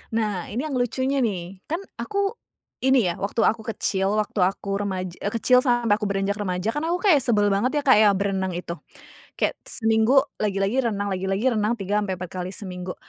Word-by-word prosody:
Nah 210 -6 -1
ini 240 +6 -2
yang 280 - -3
lucunya 260 +3 0
nih 185 -3 -3
kan 330 +5 -2 0.2
aku 400 +1 -1 0.4
ini 260 -8 +3
ya, 170 - -4
waktu 200 +3 -1
aku 220 -1 +1
kecil 195 -3 -1
waktu 210 - -8
aku 195 +1 0
remaj 190 -2 -3
e 205 - -2
kecil 250 +3 +4
sampai 240 -4 +3
aku 210 - -3
beranjak 200 +1 -1
remaja 185 0 -2
kan 295 +7 -2
aku 350 +2 -1
kaya 305 - +7
sebel 215 -6 +2
banget 255 +9 +1
ya - - -19
Kak 260 -5 +6
ya 215 -1 +6
berenang 190 -1 -1
itu, 170 -1 -5 0.6
kayak - - -1
seminggu 225 +4 +3 0.2
lagi-lagi 200 +3 0
renang 205 -3 -1
lagi-lagi 195 +3 -1
renang 210 +2 +1
3 205 -2 -1
ampe 200 -2 -2
4 180 -1 -6
kali 185 0 -5
seminggu 180 -3 -6
205 Hz, 195 wpm, -24 LUFS, 190-240 Hz, 0.6 s, kaya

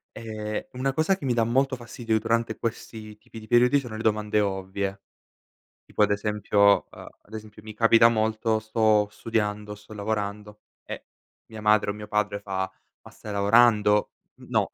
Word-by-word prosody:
Ehm, 110 -1 -5
una 135 +2 -1
cosa 160 +7 +2
che 175 - -14
mi 125 - +1
dà 115 -1 +2
molto 135 +3 +1
fastidio 115 -2 -2
durante 115 0 -1
questi 110 -2 -6
tipi 110 - -12
di 110 - -13
periodi 125 +4 +4
sono 120 -5 -8
le 110 - -5
domande 105 -1 +1
ovvie. 95 0 -3 0.8
Tipo - - -3
ad 105 - +2
esempio, 100 -1 +2
a - - -12 0.2
ad 110 - -20
esempio 110 -1 -9
mi 110 0 -9
capita 115 +1 +6
molto, 110 0 0
sto 110 -1 +2
studiando, 105 -1 -3
sto 105 +1 -14
lavorando 105 0 -4 0.2
e - - -8 0.5
mia 110 - -8
madre 105 -1 +3
o - - -6
mio 105 0 -9
padre 105 -1 -1
fa: 95 -2 -3 0.3
"Ma - - -14
stai 105 - -9
lavorando?" 105 0 +4 0.3
N - - -14
no, - - +1
110 Hz, 170 wpm, -25 LUFS, 105-115 Hz, 0.8 s, capita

